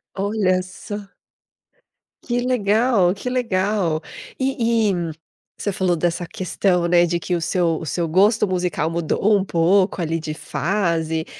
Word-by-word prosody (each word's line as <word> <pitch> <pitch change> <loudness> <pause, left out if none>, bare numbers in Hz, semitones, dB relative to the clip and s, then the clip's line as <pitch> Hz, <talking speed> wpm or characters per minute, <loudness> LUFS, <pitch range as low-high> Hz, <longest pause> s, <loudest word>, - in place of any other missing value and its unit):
Olha 195 -2 +1
só. 200 +2 -7 1.3
Que 245 -1 -1
legal, 220 -5 +2
que 250 - -4
legal. 195 -8 0 0.4
E 230 -5 +1
e, - - 0 0.6
você 205 - -2
falou 185 -2 +1
dessa 175 +1 -1
questão, 180 -1 0
né, 175 0 +5
de 170 0 -1
que 180 +1 -2
o 170 - -2
seu 165 -1 0
o 165 - -6
seu 170 +2 -1
gosto 205 +6 +3
musical 175 -3 -1
mudou 170 +5 +1
um 195 - +2
pouco 185 +2 +2
ali 165 +1 -1
de 155 -1 -5
fase, 165 0 -1
185 Hz, 140 wpm, -21 LUFS, 170-210 Hz, 1.3 s, né